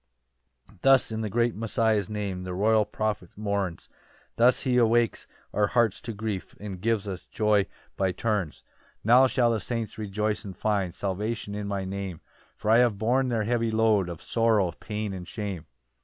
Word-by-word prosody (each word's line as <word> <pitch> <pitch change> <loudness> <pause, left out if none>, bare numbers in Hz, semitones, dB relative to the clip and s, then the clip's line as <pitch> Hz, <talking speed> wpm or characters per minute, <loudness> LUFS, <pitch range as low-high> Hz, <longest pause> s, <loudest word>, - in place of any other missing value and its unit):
5 100 - -22
Thus 135 -3 +5
in 110 0 -2
the 110 - -2
great 120 +3 +1
Messiah's 110 -2 +1
name, 100 -3 -3
The 90 -1 -5
royal 110 +2 +3
prophet 105 -6 -3
mourns; 100 -5 -2 0.5
Thus 120 +2 +4
he 125 -1 +1
awakes 120 -1 +2 0.3
our 105 -1 +2
hearts 115 -3 +1
to 120 - -5
grief, 105 -3 -4
And 100 -3 -7
gives 110 -1 0
us 95 -3 -6
joy 105 -3 +2 0.3
by 95 -1 +1
turns. 100 -6 -1
6 - - -24 0.4
"Now 125 +4 +6
shall 125 -2 +2
the 115 - 0
saints 115 -1 -4
rejoice 105 +1 -1
and 95 -3 -8
find 100 -5 0
"Salvation 105 +2 -3
in 105 0 -4
my 100 -1 -2
Name: 95 -3 -5 0.4
"For 105 - 0
I 115 - +7
have 120 -5 +3
borne 125 +5 +1
their 115 -3 0
heavy 115 +1 0
load 110 -4 +2
Of 85 -2 -8
sorrow, 110 -6 +2
pain, 105 +3 -5
and 90 -2 -7
shame. 100 -7 -5
105 Hz, 180 wpm, -27 LUFS, 100-115 Hz, 0.5 s, I